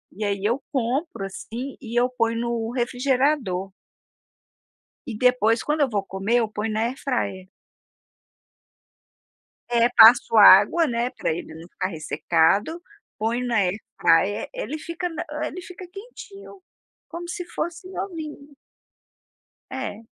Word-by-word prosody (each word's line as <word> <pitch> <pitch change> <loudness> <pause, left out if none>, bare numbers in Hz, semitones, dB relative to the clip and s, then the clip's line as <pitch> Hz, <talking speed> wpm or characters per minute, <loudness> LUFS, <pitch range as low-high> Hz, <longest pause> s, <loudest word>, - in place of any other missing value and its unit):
e 215 - -5
aí 200 -1 -2
eu 240 +6 0
compro, 260 - -2
assim, 235 +7 -7
e 240 -1 -1
eu 245 - +3
ponho 230 -2 -1
no 235 -1 -2
refrigerador. 245 -5 0 1.3
E 250 - -5
depois 230 -1 +2
quando 300 0 0
eu 280 - +3
vou 205 -4 -1
comer, 195 +4 -1
eu 225 -2 0
ponho 215 +1 -3
na 215 - -1
air 235 +3 -1
fryer. 200 -9 -3 2.2
É. 235 0 +4
Passo 230 0 +7
água, 210 - +7
né, 240 -2 -1
pra 250 - -2
ele 160 0 -7
não 160 - -11
ficar 185 - -3
ressecado, 175 - 0 0.4
ponho 235 +3 -1
na 240 -1 0
air 195 -1 +1 0.2
fryer, 195 +5 +2
ele - - -5
fica 335 +3 -4
não, 325 -2 -5 0.2
eh, 310 - -1
ele 365 +3 -8
fica 365 +1 -10
quentinho, 400 -1 -12 0.5
como 345 +1 -7
se 355 0 -5
fosse 345 +1 -5
novinho. 315 -7 -7 1.2
É. 260 -4 -6
240 Hz, 135 wpm, -23 LUFS, 210-305 Hz, 2.2 s, Passo